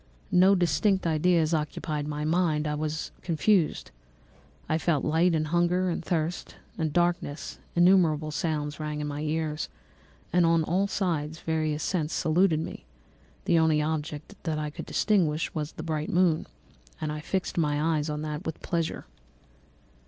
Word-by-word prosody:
No 185 +2 +6
distinct 180 +3 +2
ideas 165 0 +2
occupied 150 -1 -2
my 150 0 -3
mind; 160 -2 +1
all 150 0 -1
was 155 +1 -3
confused. 175 +1 +1 0.8
I 155 - +1
felt 160 -4 +1
light, 165 +3 +3
and 155 -1 -1
hunger, 175 +2 +2
and 170 - -3
thirst, 165 0 -2 0.2
and 160 -2 -1
darkness; 175 -3 -1 0.2
innumerable 170 -4 +4
sounds 150 -2 -2
rang 150 -1 -3
in 150 - -2
my 145 0 -4
ears, 155 0 -2 0.6
and 175 0 +5
on 165 -1 +4
all 185 +5 +1
sides 165 -6 -2
various 155 -2 -1
scents 165 -4 -1
saluted 160 0 +2
me; - - -7 0.6
the 170 - +4
only 160 -1 +3
object 150 +2 -3
that 160 -2 -2
I 150 -1 -3
could - - -8
distinguish 170 -7 +1
was 155 -1 -3
the 155 - -7
bright 155 -2 -2
moon, 175 -3 +2 0.5
and 155 - -2
I 150 - -4
fixed 185 +4 -2
my 155 +1 +1
eyes 150 0 -1
on 150 0 -3
that 150 +2 -4
with 160 -3 -5
pleasure. 165 -2 -2
160 Hz, 155 wpm, -27 LUFS, 150-175 Hz, 0.8 s, No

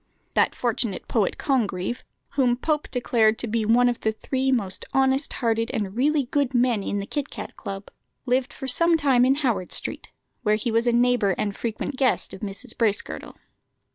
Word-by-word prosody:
That - - +2
fortunate 235 -4 -1
poet, 215 -5 0
Congreve, 225 -5 -1 0.3
whom 255 -3 +2
Pope 300 +2 -1
declared 225 -3 +2
to - - -2
be 225 0 0
one 240 +3 +4
of 240 -1 0
the 220 - 0
three 265 +4 -1
most 200 -7 0
honest 270 +1 +2
hearted 230 -1 0
and 200 -2 -3
really 285 +3 +2
good 275 0 0
men 240 -3 +3
in 200 - -2
the 200 - -3
Kit 290 +6 -3
cat - - -8
Club, 195 0 -7 0.3
lived 260 +2 +1
for 265 - -7
some 335 +6 +4
time 265 -5 +4
in 265 +1 +4
Howard 235 -11 -1
Street, - - -2 0.3
where 215 -3 +2
he 225 +2 -2
was 230 +2 +1
a - - +5
neighbour 240 -5 +3
and 205 -1 -2
frequent 235 +4 -4
guest 260 -1 +1
of - - -9
Mrs. 210 +4 -4
Bracegirdle. 215 -3 -1
240 Hz, 185 wpm, -24 LUFS, 215-265 Hz, 0.3 s, a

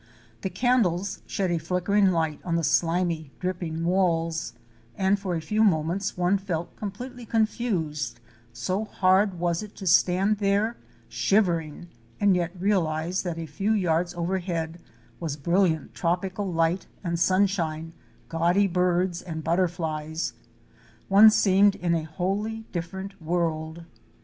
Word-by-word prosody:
The 190 - -2
candles 200 -3 +1
shed 190 -3 -1
a 170 - +1
flickering 180 +5 +2
light 160 -4 0
on 170 -2 -1
the 170 - 0
slimy, 165 0 +1
dripping 175 -3 -3
walls 165 -3 +1 0.4
and 195 +1 +2
for 185 -3 -2
a 165 - -2
few 210 +7 +1
moments 180 +1 +1
one 180 +3 +2
felt 175 -4 -4
completely 245 +5 -7
confused 195 - -1 0.3
—so 185 - -2
hard 190 -1 +2
was 170 -1 0
it 210 -1 -10
to 195 - -8
stand 190 +3 +3
there 205 +3 +1 0.3
shivering 175 -5 0 0.3
and 200 -2 +4
yet 175 +1 -2
realize 175 -3 0
that 175 -3 -4
a 165 - -4
few 195 +9 -1
yards 175 -3 +1
overhead 170 -2 -2 0.4
was 155 -4 -3
brilliant 170 0 +1
tropical 185 +3 -1
light 165 +2 0 0.2
and 170 -2 -2
sunshine, 170 -4 +1 0.3
gaudy 170 +5 +2
birds 180 -1 +1
and 160 -3 -6
butter 175 +3 +2
flies: 160 -2 -3 0.8
One 205 +3 +9
seemed 200 -1 +4
in 175 -1 -1
a 160 -2 0
wholly 200 +7 -3
different 190 +3 -6
world. 165 0 -2
180 Hz, 135 wpm, -26 LUFS, 165-195 Hz, 0.8 s, One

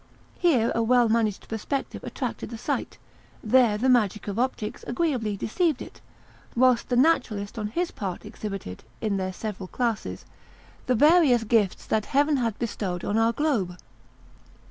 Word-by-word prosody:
Here 260 -10 +3
a 230 - +1
well 240 +1 +4
managed 220 -3 0
perspective 225 +5 -4
attracted - - -4
the 230 - -6
sight; 230 - -3 0.5
there 225 -1 +4
the 245 +5 0
magic 215 -6 +2
of 205 +2 -3
optics 245 -4 -2
agreeably 240 -7 -1
deceived 305 - 0
it; - - -10 0.5
whilst 250 -1 +3
the 250 - +1
naturalist 245 -7 +1
on 210 - -2
his 345 +11 -2
part 195 -1 -5
exhibited, 195 - -6 0.2
in 210 -3 -1
their 185 -1 -2
several 195 -1 -6
classes, 230 0 -3 0.6
the 255 - +3
various 295 -3 +5
gifts 210 -3 +1
that 215 -1 0
Heaven 290 +1 +2
had 230 -4 -1
bestowed 200 -6 -3
on 205 - -1
our 225 +1 +3
globe. 235 - -1
230 Hz, 150 wpm, -26 LUFS, 210-255 Hz, 0.6 s, various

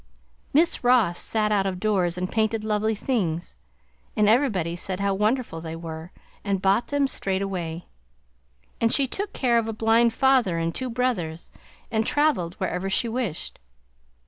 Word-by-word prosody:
Miss 325 +1 +2
Ross 240 -8 +3
sat 215 -1 0
out 195 -2 +2
of 185 -1 -3
doors 180 -4 +1
and 185 0 -3
painted 220 0 0
lovely 215 0 0
things, 180 -9 -2 0.6
and 210 -1 +4
everybody 210 - +2
said 185 +1 -3
how 200 0 +1
wonderful 210 -3 0
they 160 0 -6
were, 165 +1 -7 0.3
and 200 -2 0
bought 195 +5 +2
them 285 -1 +1
straight 195 -7 -1
away; 175 -3 -4 1.0
and 230 0 +3
she 275 -2 +3
took 400 +10 -3
care 240 -3 +2
of 225 - -3
a 225 - -3
blind 225 +2 +3
father 250 -8 +3
and 165 0 -1
two 260 -1 -3
brothers, 230 -10 -2 0.4
and 220 0 0
traveled 270 - +1
wherever 185 0 -2
she 235 +5 0
wished. 230 -8 -4
210 Hz, 160 wpm, -25 LUFS, 180-235 Hz, 1.0 s, and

